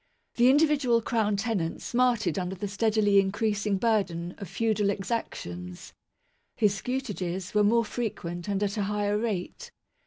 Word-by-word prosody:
The 245 +1 +6
individual 280 -4 +4
Crown 220 -2 0
tenant 195 -6 -2
smarted 240 -4 +1
under 180 +1 -3
the 205 +3 -4
steadily 205 -1 +3
increasing 205 +1 0
burden 190 -6 0
of 195 - -7
feudal 215 -3 0
^exactions. 90 - -4 0.6
His 210 -3 +3
scutages 195 -6 -4
were 210 0 +4
more 230 +3 +3
frequent 175 -7 -4
and 200 0 0
at 205 +1 -2
a 205 - +1
higher 205 0 0
rate. 220 - -3
205 Hz, 135 wpm, -27 LUFS, 195-230 Hz, 0.6 s, The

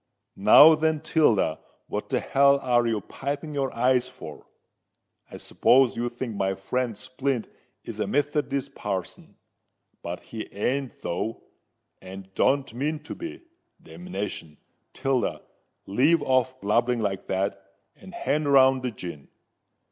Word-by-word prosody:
"Now, 110 +11 +8
then, 160 0 +1
Tilda—what 115 - 0
the - - 0
hell 140 0 +4
are 120 -2 +2
you 110 -3 0
piping 140 +7 -5
your 135 -2 -1
eyes 125 +1 +2
for? 80 -12 -11 0.8
I - - -9
s'pose 130 -1 +3
you 120 +1 -2
think 120 -2 -6
my 95 -1 0
friend 115 +3 -2
Splint 130 +1 -3 0.4
is - - -8
a - - -1
Methodist 140 -1 -1
parson? 95 -7 -5 0.7
But 85 +1 -6
he 110 -1 -8
ain't 130 +5 -2
though—and 95 -1 -8
don't 135 +1 +1
mean 145 +6 -2
to 150 - -7
be. 340 0 -8 0.4
Damnation! 105 - -7 0.4
Tilda, 135 -3 -1 0.4
leave 145 +11 +3
off 130 0 +1
blubbering 120 +4 +1
like 100 -3 -3
that—and 95 -3 -5
hand 145 -1 0
round 130 -1 +5
the 125 - -2
gin. 85 - -8
125 Hz, 125 wpm, -25 LUFS, 105-140 Hz, 0.8 s, Now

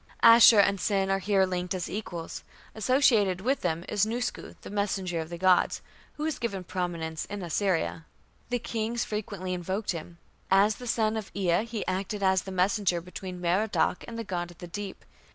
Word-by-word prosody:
" - - -27
Ashur 230 -2 +8
and 200 -1 +3
Sin 195 -2 +1
are 195 - +2
here 195 -1 +3
linked 180 0 -2
as 180 - -3
equals. 175 -5 -6 0.3
Associated 220 -5 +3
with 265 +6 0
them 170 0 -1
is 205 -2 +1
Nusku, 235 +3 -3
the - - -9
messenger 195 -4 -1
of 160 0 -5
the 170 - -6
gods, 185 0 +3 0.3
who 300 - -6
was 315 -1 -2
given 200 -6 -3
prominence 170 -3 -3
in 205 -2 -6
Assyria. 170 -2 -1 0.4
The 245 - +1
kings 230 0 -2
frequently 200 -3 -4
invoked 190 +4 -2
him. 170 0 -7 0.3
As 200 +2 +4
the 250 - -8
son 220 -1 +1
of 215 - -5
Ea 190 +1 +1
he 230 -3 -4
acted 195 +2 -2
as 190 -1 +3
the 190 - -8
messenger 185 -1 +1
between 180 +1 -8
Merodach 180 +2 +1
and 230 - -7
the 230 - -3
god 175 -4 -3
of 175 - -14
the - - -8
deep. 195 +2 -7
195 Hz, 190 wpm, -28 LUFS, 180-215 Hz, 0.4 s, Ashur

